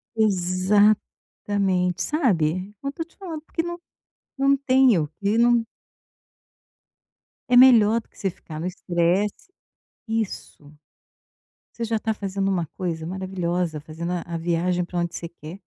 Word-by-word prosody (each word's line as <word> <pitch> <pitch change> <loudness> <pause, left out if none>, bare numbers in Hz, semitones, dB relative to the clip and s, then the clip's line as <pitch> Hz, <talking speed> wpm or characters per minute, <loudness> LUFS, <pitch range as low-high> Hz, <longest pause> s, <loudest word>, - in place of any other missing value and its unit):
Exatamente, 195 -1 +1
sabe, 190 - 0
não 275 - -2
tô 330 - -5
te 330 - -27
falando, 335 -6 -6
porque 330 +1 -3
não 345 0 -5 0.6
não 275 +1 +4
tenho, 255 - +3
porque 200 +7 -1
não 235 -1 +4 1.9
É 250 - +4
melhor 230 -3 +7
do - - -32
que - - -26
você 195 - 0
ficar 160 -3 -10
no 170 - -3
estresse. 180 - -1 0.6
Isso. 220 -9 -4 1.1
Você 235 - -2
já 225 -1 0
tá 220 - -1
fazendo 195 -2 -2
uma 175 -4 0
coisa 165 -3 -3
maravilhosa, 180 -3 -2
fazendo 160 +3 -6
a 175 - -2
a 170 -1 -6
viagem 175 +2 0
pra 175 0 -6
onde 170 0 -1
você 170 - -5
quer. 170 +2 -11
190 Hz, 135 wpm, -24 LUFS, 175-225 Hz, 1.9 s, melhor